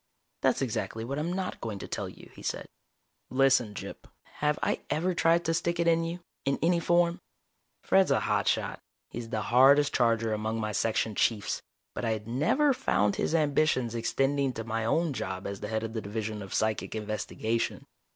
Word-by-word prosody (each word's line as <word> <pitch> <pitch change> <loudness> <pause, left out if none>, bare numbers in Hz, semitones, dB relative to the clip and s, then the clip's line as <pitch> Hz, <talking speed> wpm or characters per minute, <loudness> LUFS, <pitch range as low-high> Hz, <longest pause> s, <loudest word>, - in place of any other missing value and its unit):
"That's - - +2
exactly 110 0 -3
what 140 +4 -3
I'm 165 +3 -1
not 185 0 -3
going 110 -3 -4
to - - -7
tell - - -4
you," - - -14
he - - -13
said. - - -3 0.6
"Listen, 130 -5 +3
Gyp, - - -7 0.3
have 150 0 +2
I - - +1
ever 180 +4 +1
tried 170 0 +3
to 165 - +1
stick 170 +1 -1
it 170 - +2
in 165 0 +4
you, 170 +2 -4 0.2
in 140 - +1
any 170 +1 +3
form?" 175 0 +2 0.6
Fred's 190 -1 +4
a - - +3
hot - - 0
shot. - - 0 0.3
He's 115 -1 -6
the 110 - -2
hardest 140 +4 +5
charger 115 -2 +2
among 110 +1 -2
my 110 -1 -2
Section 110 +1 0
Chiefs. 105 0 0 0.3
But - - -5
I 115 -1 +1
had 105 0 -6
never 155 - +2
found 105 - +1
his 165 - 0
ambitions 145 -6 +2
extending 135 +3 0
to 115 - -5
my 115 0 -2
own 160 +6 +1
job 95 -5 -4
as 100 -1 -4
head 110 +1 -2
of 110 0 -4
the 110 - -2
Division 105 +1 -4
of 95 - -8
Psychic 110 0 -1
Investigation. 110 +1 -2
120 Hz, 190 wpm, -29 LUFS, 110-165 Hz, 0.6 s, hardest